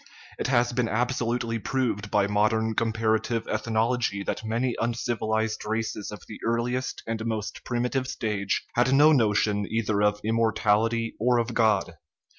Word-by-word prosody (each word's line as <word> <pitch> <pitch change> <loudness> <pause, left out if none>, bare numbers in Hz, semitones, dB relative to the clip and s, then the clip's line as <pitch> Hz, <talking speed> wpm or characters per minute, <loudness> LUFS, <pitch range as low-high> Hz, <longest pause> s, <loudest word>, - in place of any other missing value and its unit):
It - - -1
has 120 -2 +2
been 120 -1 0
absolutely 120 -1 -1
proved 110 -3 -1
by 100 -1 +3
modern 110 +2 +1
comparative 110 +1 0
ethnology 110 -1 0
that - - -3
many 115 +3 -1
uncivilized 110 -2 -1
races 110 -1 -3
of 105 - -9
the 110 - -9
earliest 120 +2 -1
and 115 -1 -3
most 110 -2 -4
primitive 125 +2 -1
stage 105 -6 -2
had 125 +2 +2
no 150 +3 +7
notion 105 -5 +2
either 110 -2 0
of 105 0 +2
immortality 115 0 +1
or 120 +2 +3
of 120 0 -1
God. 105 -7 +1
115 Hz, 140 wpm, -26 LUFS, 110-120 Hz, -, no